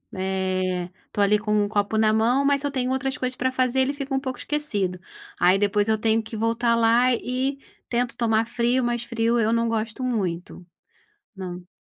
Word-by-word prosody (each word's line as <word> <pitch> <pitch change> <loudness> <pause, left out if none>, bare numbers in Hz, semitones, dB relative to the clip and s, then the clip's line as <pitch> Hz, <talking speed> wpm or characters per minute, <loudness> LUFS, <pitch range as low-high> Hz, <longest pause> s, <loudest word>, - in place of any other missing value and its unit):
Eh, 185 -1 -1 0.2
estou 205 - 0
ali 210 +1 +3
com 210 0 -2
um 205 - -2
copo 210 0 0
na 215 0 +4
mão, 235 +5 +2
mas 280 0 +3
se 285 - -1
eu 285 - -4
tenho 255 -2 -1
outras 265 0 -1
coisas 255 0 -3
para 260 - +1
fazer, 255 0 +1
ele 265 +2 +2
fica 275 -1 -5
um 270 - +2
pouco 260 -2 -5
esquecido. 205 -12 -2 0.4
Aí 180 +2 +5
depois 205 +1 +1
eu 220 0 +2
tenho 225 +1 +2
que 220 +1 -9
voltar 230 +2 +1
lá 235 +2 +4
e 260 +3 -2 0.3
tento 245 0 -1
tomar 225 -1 +2
frio, 240 +2 +1
mas 240 0 -1
frio 235 0 +1
eu 225 0 +2
não 230 0 +1
gosto 225 +2 -2
muito. 185 -9 -3 0.7
Não. 180 -2 -7
230 Hz, 200 wpm, -24 LUFS, 205-255 Hz, 0.7 s, Aí